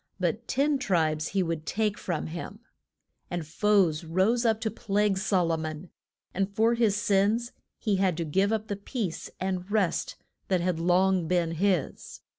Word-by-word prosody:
But 190 Hz, +6 st, -1 dB
ten 280 Hz, +1 st, +1 dB
tribes 160 Hz, -, +1 dB
he 195 Hz, -1 st, 0 dB
would 165 Hz, -2 st, -3 dB
take 210 Hz, -1 st, 0 dB
from 175 Hz, -6 st, -3 dB
him. 175 Hz, +6 st, -7 dB, 0.7 s
And 175 Hz, -2 st, -3 dB
foes 180 Hz, -1 st, +2 dB
rose 190 Hz, +9 st, +1 dB
up 220 Hz, -1 st, +2 dB
to 220 Hz, -1 st, -1 dB
plague 205 Hz, -1 st, 0 dB
Sol 190 Hz, -3 st, +1 dB
o 165 Hz, -, +1 dB
mon, 160 Hz, +2 st, -6 dB, 0.4 s
and 195 Hz, +1 st, 0 dB
for 225 Hz, +3 st, +3 dB
his 230 Hz, -4 st, +2 dB
sins 210 Hz, +3 st, +1 dB, 0.3 s
he 210 Hz, -4 st, 0 dB
had 185 Hz, -4 st, +1 dB
to 170 Hz, -, -2 dB
give 190 Hz, +7 st, +1 dB
up 220 Hz, -1 st, -1 dB
the 205 Hz, -, -2 dB
peace 200 Hz, -, -4 dB
and 185 Hz, 0 st, -3 dB
rest 205 Hz, -5 st, 0 dB, 0.3 s
that 185 Hz, -2 st, +2 dB
had 175 Hz, -1 st, -1 dB
long 180 Hz, 0 st, +2 dB
been 175 Hz, -2 st, +1 dB
his. 175 Hz, -2 st, -1 dB
190 Hz, 170 wpm, -27 LUFS, 170-210 Hz, 0.7 s, for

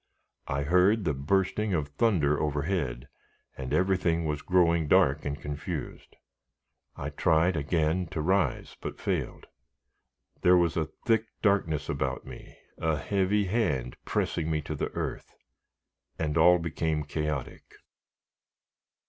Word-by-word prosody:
I 70 Hz, +1 st, -1 dB
heard 90 Hz, +7 st, +3 dB
the 75 Hz, -, +1 dB
bursting 95 Hz, +8 st, 0 dB
of 75 Hz, -3 st, -2 dB
thunder 75 Hz, -3 st, +2 dB
overhead, 75 Hz, -4 st, -2 dB, 0.5 s
and 65 Hz, -1 st, -6 dB
everything 90 Hz, -3 st, +1 dB
was 75 Hz, -1 st, -2 dB
growing 85 Hz, -3 st, +3 dB
dark 70 Hz, +1 st, +3 dB
and 70 Hz, 0 st, -3 dB
confused. 75 Hz, 0 st, -6 dB, 0.8 s
I 70 Hz, +2 st, -5 dB
tried 80 Hz, +3 st, +2 dB
again 80 Hz, +3 st, 0 dB
to 80 Hz, -, -5 dB
rise, 95 Hz, +4 st, 0 dB
but -, -, -6 dB
failed. -, -, -3 dB, 1.0 s
There 90 Hz, 0 st, +6 dB
was 85 Hz, -2 st, +2 dB
a 80 Hz, -2 st, -1 dB, 0.2 s
thick 115 Hz, -1 st, +2 dB, 0.2 s
darkness 95 Hz, -8 st, +1 dB
about -, -, -2 dB
me, -, -, -11 dB, 0.2 s
a 80 Hz, -2 st, +1 dB
heavy 100 Hz, +4 st, +1 dB
hand 75 Hz, -, -1 dB
pressing 80 Hz, -2 st, -1 dB
me 80 Hz, -1 st, +1 dB
to 75 Hz, -, -4 dB
the 75 Hz, -, -2 dB
earth, -, -, -5 dB, 0.8 s
and 75 Hz, -2 st, -1 dB
all 90 Hz, +2 st, +6 dB
become 80 Hz, -2 st, -2 dB
chaotic. 75 Hz, -2 st, -4 dB
80 Hz, 125 wpm, -28 LUFS, 75-90 Hz, 1.0 s, There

